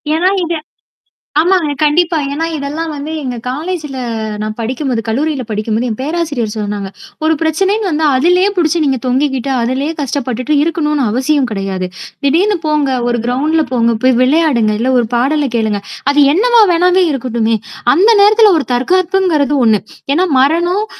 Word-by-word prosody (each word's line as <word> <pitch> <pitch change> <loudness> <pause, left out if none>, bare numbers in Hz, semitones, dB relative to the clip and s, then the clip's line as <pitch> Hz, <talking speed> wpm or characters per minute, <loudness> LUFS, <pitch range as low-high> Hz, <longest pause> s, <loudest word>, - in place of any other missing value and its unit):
ஏன்னா 355 +3 +2
இது 335 0 -2 0.8
ஆமாங்க 335 -3 +2
கண்டிப்பா. 330 +3 +2 0.2
ஏன்னா 320 +3 -2
இதெல்லாம் 300 +3 -4
வந்து 295 +1 -6
எங்க 250 -2 -4
காலேஜ்ல 300 +1 -4 0.4
நான் 215 0 -4
படிக்கும்போது 250 +1 -2
கல்லூரியில 275 +4 -1
படிக்கும்போது, 220 +3 -2
என் 220 - -4
பேராசிரியர் 290 -7 -2
சொன்னாங்க. 205 -2 -4 0.4
"ஒரு 320 - +3
பிரச்சனைன்னு 385 +6 0
வந்தா 315 -1 0
அதுலே 360 +7 +3
புடிச்சு 340 -2 +1
நீங்க 270 -2 +1
தொங்கிக்கிட்டு, 265 0 0
அதுலே 260 +5 -1
கஷ்டப்பட்டுட்டு 260 0 -2
இருக்கணும்ன்னு 300 -4 0
அவசியம் 265 +3 +1
கிடையாது. 195 -2 -3 0.4
திடீர்ன்னு 365 +8 +2
போங்க 300 -2 +1 0.2
ஒரு 240 0 0
கிரவுண்ட்ல 300 +6 +1
போங்க, 235 -1 +2
போய் 255 -1 +4
விளையாடுங்க. 255 -6 +2
இல்ல 255 +3 0
ஒரு 235 - +1
பாடலை 275 +3 +1
கேளுங்க. 215 -3 -1 0.3
அது 290 - +1
என்னவா 470 +6 +4
வேணாவே 360 +2 +3
இருக்கட்டுமே. 235 -4 -1 0.4
அந்த 395 +7 +4
நேரத்துல 425 +1 +5
ஒரு 280 - -4
தற்காப்புங்கிறது 340 +1 +1
ஒண்ணு. 215 -4 +3 0.3
ஏன்னா 360 +5 +2
மரணம், 345 +9 +1
290 Hz, 145 wpm, -14 LUFS, 245-335 Hz, 0.8 s, நேரத்துல